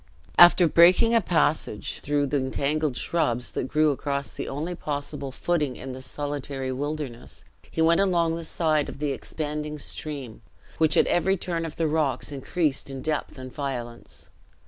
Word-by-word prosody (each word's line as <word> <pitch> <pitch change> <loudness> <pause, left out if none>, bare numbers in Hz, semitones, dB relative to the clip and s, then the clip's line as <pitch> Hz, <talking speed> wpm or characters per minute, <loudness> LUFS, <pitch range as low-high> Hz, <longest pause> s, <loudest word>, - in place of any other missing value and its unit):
After 175 0 +8
breaking 180 +9 +6
a 230 - +5
passage, 160 - 0
through 145 0 0
the 145 +1 0
entangled 140 +1 -1
shrubs 125 -8 0
that - - -2
grew 155 +2 +3
across 140 0 -3
the - - -5
only 155 +6 -3
possible 145 -3 -4
footing 150 -2 -1
in 130 - -7
this 130 0 -8
solitary 140 -2 -4
wilderness, 140 -2 -5 0.2
he 160 - 0
went 170 +3 +4
along 170 -4 +2
the 165 - -5
side 155 -2 0
of - - -8
the 145 0 -1
expanding 150 +2 -4
stream, 140 -5 -6 0.4
which 155 -2 +4
at - - +6
every 190 +3 +2
turning 170 -2 -2
of 155 - -6
the 165 - 0
rocks 150 -4 0
increased 145 +1 -1
in 135 -1 -6
depth 155 -2 -2
and 130 -1 -9
violence. 120 -5 -6
150 Hz, 165 wpm, -26 LUFS, 135-165 Hz, 0.4 s, After